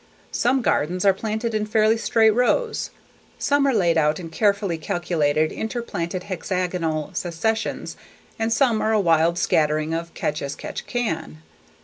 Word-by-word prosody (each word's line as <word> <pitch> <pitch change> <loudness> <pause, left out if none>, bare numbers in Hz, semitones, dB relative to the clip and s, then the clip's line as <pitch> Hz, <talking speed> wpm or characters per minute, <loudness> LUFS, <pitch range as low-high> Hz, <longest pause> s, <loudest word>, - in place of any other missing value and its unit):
Some 265 -1 +1
gardens 180 +2 0
are 195 - +6
planted 220 +3 -3
in 215 0 -1
fairly 215 +1 +3
straight 225 -1 +3
rows, 345 - +1 0.5
some 285 0 +2
are - - +4
laid 175 -8 +2
out 150 +1 +2
in 165 -2 -8
carefully 200 -2 +1
calculated 155 -2 0
interplanted 190 -6 -4
hexagonal 180 -4 -2
successions 200 +6 -2 0.4
and 225 +1 0
some 230 -2 +2
are 220 - +1
a 215 - +3
wild 165 -2 +3
scattering 155 -1 +1
of 165 +1 -3
catch 150 +1 -2
as 140 0 -4
catch - - -7
can. 165 - -3
185 Hz, 145 wpm, -23 LUFS, 165-220 Hz, 0.5 s, are